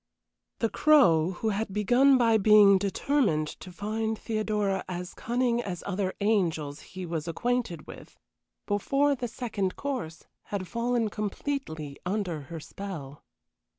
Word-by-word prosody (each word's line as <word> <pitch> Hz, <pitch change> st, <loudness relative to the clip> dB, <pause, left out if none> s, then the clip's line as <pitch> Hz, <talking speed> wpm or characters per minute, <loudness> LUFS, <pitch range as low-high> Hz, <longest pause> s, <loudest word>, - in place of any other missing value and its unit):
The 225 Hz, -, +2 dB
Crow, 190 Hz, -, +4 dB
who 220 Hz, +5 st, -2 dB
had 210 Hz, 0 st, -2 dB
begun 245 Hz, +7 st, +4 dB
by 230 Hz, -3 st, +4 dB
being 205 Hz, -1 st, +7 dB
determined 200 Hz, -, +1 dB
to 185 Hz, -, -10 dB
find 220 Hz, +4 st, -2 dB
Theodora 210 Hz, -3 st, -1 dB
as 180 Hz, 0 st, -5 dB
cunning 240 Hz, 0 st, 0 dB
as 185 Hz, -6 st, -5 dB
other 190 Hz, -1 st, -1 dB
angels 165 Hz, -9 st, 0 dB
he 185 Hz, 0 st, -8 dB
was 165 Hz, -1 st, -4 dB
acquainted 220 Hz, -2 st, -1 dB
with, -, -, -12 dB, 0.5 s
before 275 Hz, +8 st, +2 dB
the 245 Hz, -3 st, -3 dB
second 220 Hz, -6 st, -3 dB
course 250 Hz, -, -4 dB, 0.2 s
had 195 Hz, -3 st, -4 dB
fallen 235 Hz, 0 st, 0 dB
completely 200 Hz, -, -4 dB
under 180 Hz, -4 st, -2 dB
her 165 Hz, -1 st, -5 dB
spell. 155 Hz, -6 st, -8 dB
205 Hz, 130 wpm, -28 LUFS, 180-235 Hz, 0.5 s, being